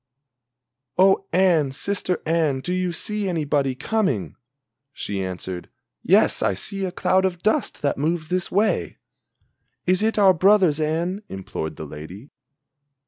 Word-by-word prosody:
"Oh 195 +1 +4
Anne, 170 -6 +3
sister 185 +3 -1
Anne, 155 -5 +1
do 180 +6 -3
you 185 -1 -1
see 210 +3 -2
anybody 145 -5 0
coming?" 130 - -1 0.6
She 100 -7 -4
answered: 90 -1 -6 0.3
"Yes - - +4
I 95 - +1
see 195 - -3
a 185 - -3
cloud 185 +1 +1
of 180 -2 -2
dust 215 -6 0
that 140 -1 0
moves 155 +1 -1
this 180 0 -1
way." 210 +3 0 0.9
"Is 185 +2 +2
it 220 +1 +1
our 195 -2 +6
brothers, 185 -3 +4
Anne?" 165 +6 -1
implored 95 -4 -5
the 80 - -7
lady. 85 - -10
170 Hz, 140 wpm, -23 LUFS, 135-190 Hz, 0.9 s, our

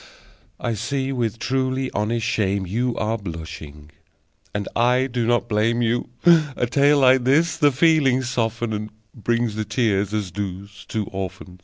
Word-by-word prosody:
(I 120 - -2
see 130 +5 -2
with 120 -4 -1
truly 130 +2 -1
honest 110 +2 -1
shame 100 -2 0
you 120 +6 -1
Are 110 +1 -1
blushing, 80 -4 -8 0.6
and 100 -1 -3
I 125 +2 +3
do 120 -3 -2
not 120 0 +1
blame 115 +2 +1
you. 120 +1 0 0.5
A - - +1
tale 140 +4 +3
like 130 -2 +5
this 155 +5 +3
the 145 -3 +4
feelings 135 -3 +3
softens, 115 -1 -1
And 105 0 -4 0.3
brings 120 -2 +1
the 110 +1 -2
tears, 105 -3 0
as 105 -4 -2
does 100 0 -6
"Two 110 -2 -2
Orphans.") 95 -1 -7
115 Hz, 155 wpm, -22 LUFS, 100-130 Hz, 0.6 s, like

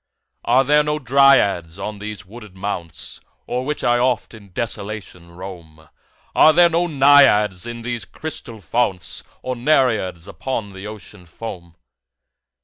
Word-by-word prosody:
Are 125 +3 +4
there 150 +2 +4
no 150 0 -1
Dryads 125 - +3
on 100 +1 -5
these 105 -3 -7
wooded 105 -1 -13
mounts 90 -4 -5 0.3
O'er 125 +1 -2
which 150 +2 -3
I 120 0 +3
oft 125 -2 0
in 100 -3 -14
desolation 100 -4 -5
roam? 85 -4 -11 0.4
Are 155 - +6
there 175 +1 +6
no 170 +1 +1
Naiads 135 - +5
in 120 -1 -7
these 120 -1 -3
crystal 120 -8 -7
founts? 95 -2 -1 0.2
Nor 130 - -2
Nereids 115 - +1
upon 115 -4 -4
the 95 +1 -9
Ocean 105 -3 -11
foam? 85 -2 -9
110 Hz, 140 wpm, -20 LUFS, 95-130 Hz, 0.4 s, Are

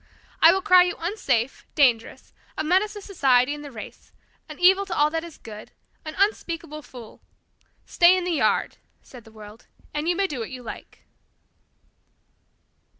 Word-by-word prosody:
I - - +8
will 385 - -1
cry 365 -3 +6
you 355 0 0
unsafe, 275 - -2
dangerous, 245 -6 +1 0.2
a - - -1
menace 375 +6 +1
to 415 - -9
society 270 -8 +2
and 295 0 -8
the 290 - -8
race, 220 -4 -11 0.4
an 305 - -9
evil 380 +2 +4
to 350 - -4
all 295 +1 +3
that 325 0 -3
is 340 -2 -11
good, 215 -1 -11 0.3
an 310 - -8
unspeakable 335 -6 -2
fool. 245 -6 -13 0.6
Stay 355 +1 +4
in 365 - -2
the 360 - -2
yard," 325 - 0 0.3
said 245 -3 -14
the 220 - -16
world, 215 0 -14 0.3
"and 300 +3 -2
you 350 - +1
may 395 - +1
do 295 -9 -5
what 225 - -5
you 255 -1 -9
like." 230 - -11
305 Hz, 170 wpm, -24 LUFS, 250-360 Hz, 0.6 s, I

